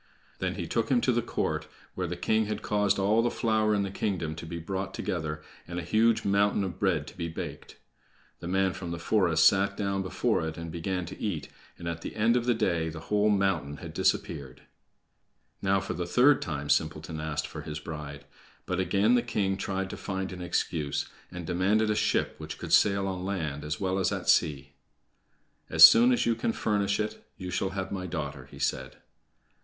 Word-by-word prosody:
Then - - -1
he - - -4
took - - -1
him - - +4
to - - +2
the - - +1
court, - - -2 0.3
where 90 -1 -3
the 90 - -3
king 110 +4 +1
had 105 - -4
caused 105 -1 +2
all 105 +3 +3
the 120 - +1
flour 110 -2 +1
in 100 - +1
the 100 - -4
kingdom 95 -6 -2
to 80 - -7
be 85 - -5
brought 95 +3 -4
together, 75 -3 -3 0.2
and 85 0 -6
a 90 - -3
huge 110 +5 +2
mountain 100 0 +2
of 90 -4 -5
bread - - +1
to - - -12
be 85 -2 -3
baked. 80 - -7 0.6
The 85 - -7
man 95 +1 +1
from 90 - -6
the 85 - -3
forest 85 -2 +2
sat 100 0 +4
down 100 -1 -1
before 95 -3 0
it 80 - -6
and 85 -1 -6
began 90 +2 -2
to - - -9
eat, 85 -9 -3 0.3
and 85 - -7
at 85 -1 -3
the - - -7
end 110 +2 +3
of 120 -1 +1
the 120 - +3
day 85 -7 0
the 80 0 -7
whole 105 0 +3
mountain 95 -8 +1
had - - -8
disappeared. 65 -3 -1 1.0
Now, 100 0 +2
for 95 - -4
the 90 +1 -3
third 135 +3 +5
time, 75 -4 -4
Simpleton 80 0 0
asked 80 -1 -2
for - - -7
his 75 -1 -6
bride. 75 -3 -7 0.4
But 90 0 -2
again 100 +5 +3
the 120 - +4
king 95 -4 0
tried 95 0 -3
to - - -6
find 95 -1 -4
an 90 -1 -7
excuse, 80 -4 -1 0.3
and 90 -1 -6
demanded 100 +6 +2
a - - +1
ship - - +1
which - - -7
could - - -4
sail 100 -1 +4
on 95 -1 -3
land 80 -7 -3
as 75 0 -3
well 95 0 0
as 95 - +1
at - - -4
sea. 70 -1 +2 1.0
"As 80 0 +6
soon 115 +10 +10
as 125 - +2
you 115 - +3
can 115 0 -1
furnish 100 -1 0
it, 105 0 -3
you 90 -1 -6
shall 95 - 0
have 95 0 -3
my 95 -2 -3
daughter," 75 -6 -5
he - - -12
said. - - -2
95 Hz, 210 wpm, -28 LUFS, 80-100 Hz, 1.0 s, soon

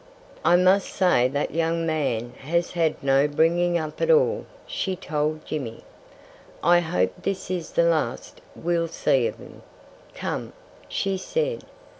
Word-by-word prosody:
"I 175 - +5
must 185 +2 +4
say 180 -10 +3
that 140 +3 -2
young 165 +1 0
man 135 -7 -1
has 170 +5 -1
had 165 -5 0
no 135 +1 +4
bringing 170 +4 +2
up 155 -2 -5
at - - +1
all," 475 -1 +3 0.2
she 190 -1 -2
told 155 -3 -2
Jimmy. 125 -7 -5 0.8
"I 175 0 +6
hope 95 - 0
this 190 -2 -3
is 175 -3 -4
the 170 - +3
last 155 -8 -1
we'll 170 0 0
see 135 -6 +1
of - - -5
him.... - - -13 0.5
Come!" - - -4 0.4
she 195 -1 -1
said. 480 - -2
165 Hz, 145 wpm, -24 LUFS, 145-175 Hz, 0.8 s, I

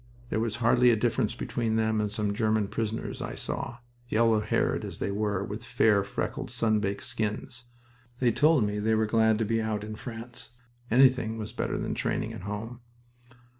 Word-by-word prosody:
There 110 - +1
was 110 -1 -1
hardly 120 +1 +4
a 120 - +5
difference 115 -1 0
between 115 -2 -2
them 110 -1 +1
and 105 -1 -1
some 105 -1 -1
German 110 -1 +1
prisoners 110 0 -3
I - - -4
saw, 120 - -4 0.3
yellow 115 -1 +3
haired 105 - 0
as - - -6
they - - -2
were, 100 -1 -1
with 105 +3 -6
fair, 110 -4 +3
freckled, 100 - -4
sun 110 -2 +1
baked 100 -1 -2
skins. 120 +4 -3 0.5
They 125 -2 +3
told 150 +1 +4
me 105 0 -1
they 110 +1 +2
were 110 0 +2
glad 110 0 +3
to 110 - 0
be 115 +1 +1
out 110 -1 -2
in 110 0 -6
France. 115 0 -8 0.4
Anything 125 -3 +4
was 110 -1 -6
better - - -2
than - - -2
training - - -2
at - - -8
home. 110 +5 -6
110 Hz, 185 wpm, -28 LUFS, 105-115 Hz, 0.5 s, a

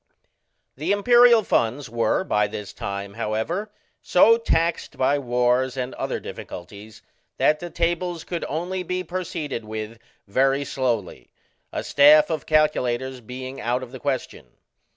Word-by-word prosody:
The 155 +7 -1
Imperial 240 +2 +6
funds 125 -2 0
were 115 +9 0
by 105 - +1
this 100 -1 -7
time, 100 0 -5
however, 115 - -3 0.3
so 225 +5 +5
taxed 170 -6 0
by 140 +2 +2
wars 125 0 +1
and 130 0 -3
other - - -3
difficulties 100 +4 -10 0.3
that 150 0 +3
the 175 - -6
tables 170 0 -1
could 170 -2 -4
only 180 +5 -3
be 180 +1 -3
proceeded 170 -9 -4
with 110 +1 -6 0.3
very 135 +6 +1
slowly, 120 -10 -2 0.4
a - - -3
staff 150 +3 +6
of 155 -3 -3
calculators 130 -4 +1
being 130 +3 -7
out 125 +2 -1
of 125 - -10
the 130 - -9
question. 135 -2 -3
135 Hz, 135 wpm, -23 LUFS, 115-170 Hz, 0.4 s, Imperial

